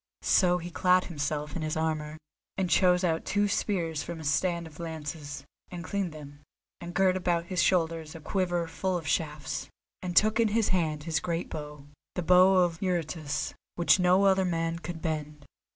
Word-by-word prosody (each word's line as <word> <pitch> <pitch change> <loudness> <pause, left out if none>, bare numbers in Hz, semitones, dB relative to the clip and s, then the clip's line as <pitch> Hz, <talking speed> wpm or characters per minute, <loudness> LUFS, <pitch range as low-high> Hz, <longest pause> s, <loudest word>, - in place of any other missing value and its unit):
So 180 -2 +4
he 175 0 -7
clad 180 +1 +3
himself 150 -2 -3
in 170 - -3
his 155 0 -2
armour, 155 -1 -2 0.4
and 185 -3 -1
chose 180 0 +4
out 165 -2 +1
two 205 0 +1
spears 170 -6 -1
from 170 -1 -6
a - - -8
stand 170 +3 0
of 155 -1 -13
lances, 150 -3 -6 0.2
and 175 -1 -7
cleaned 195 0 -2
them, 145 -2 -11 0.4
and 175 0 -8
girt 190 -1 +3
about 175 -2 0
his 180 - +2
shoulders 165 -3 +1
a - - -7
quiver 175 +1 -1
full 180 +3 -1
of 165 - -7
shafts, 150 -2 -2 0.3
and 180 -1 -4
took 215 +1 +5
in 230 - +4
hand 185 -8 0
his 160 -1 0
great 170 0 -3
bow, 150 -2 -7 0.3
the 180 - -2
Bow 185 +2 +6
of 175 -3 +2
Eurytus, 165 -5 -2 0.2
which 175 +2 +4
no 180 +2 +4
other 190 -1 +4
man 165 -2 -1
could 170 0 -7
bend. 150 -3 -4
170 Hz, 180 wpm, -28 LUFS, 155-180 Hz, 0.4 s, Bow